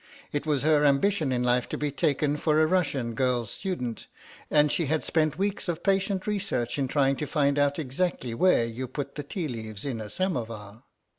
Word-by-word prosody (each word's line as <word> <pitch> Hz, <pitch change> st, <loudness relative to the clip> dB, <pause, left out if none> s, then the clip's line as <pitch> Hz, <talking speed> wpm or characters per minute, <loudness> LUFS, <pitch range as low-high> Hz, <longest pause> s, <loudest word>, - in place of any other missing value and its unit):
It 145 Hz, +1 st, -3 dB
was 145 Hz, -3 st, +1 dB
her 150 Hz, -1 st, +4 dB
ambition 150 Hz, +2 st, +2 dB
in 125 Hz, -1 st, 0 dB
life 125 Hz, 0 st, +2 dB
to -, -, -3 dB
be 150 Hz, -1 st, -1 dB
taken 145 Hz, +1 st, +1 dB
for 155 Hz, 0 st, +2 dB
a 155 Hz, -, +5 dB
Russian 150 Hz, -9 st, 0 dB
girl 125 Hz, -1 st, +1 dB
student, 125 Hz, -, -4 dB, 0.4 s
and 150 Hz, -1 st, +4 dB
she 165 Hz, -, 0 dB
had 155 Hz, +2 st, 0 dB
spent 155 Hz, -2 st, +1 dB
weeks 200 Hz, -1 st, -1 dB
of 165 Hz, -, -3 dB
patient 195 Hz, -1 st, +1 dB
research 195 Hz, -, -1 dB
in 135 Hz, -, +1 dB
trying 135 Hz, 0 st, +2 dB
to 150 Hz, -, -3 dB
find 140 Hz, -1 st, +1 dB
out 145 Hz, 0 st, +2 dB
exactly 140 Hz, -3 st, -2 dB
where 120 Hz, -2 st, +4 dB
you 120 Hz, +3 st, -5 dB
put 140 Hz, +2 st, -5 dB
the 150 Hz, -, -4 dB
tea 160 Hz, +3 st, -4 dB
leaves 110 Hz, -4 st, -6 dB
in 125 Hz, -5 st, -3 dB
a 105 Hz, -, -7 dB
samovar. 115 Hz, -, -3 dB
145 Hz, 200 wpm, -27 LUFS, 125-160 Hz, 0.4 s, a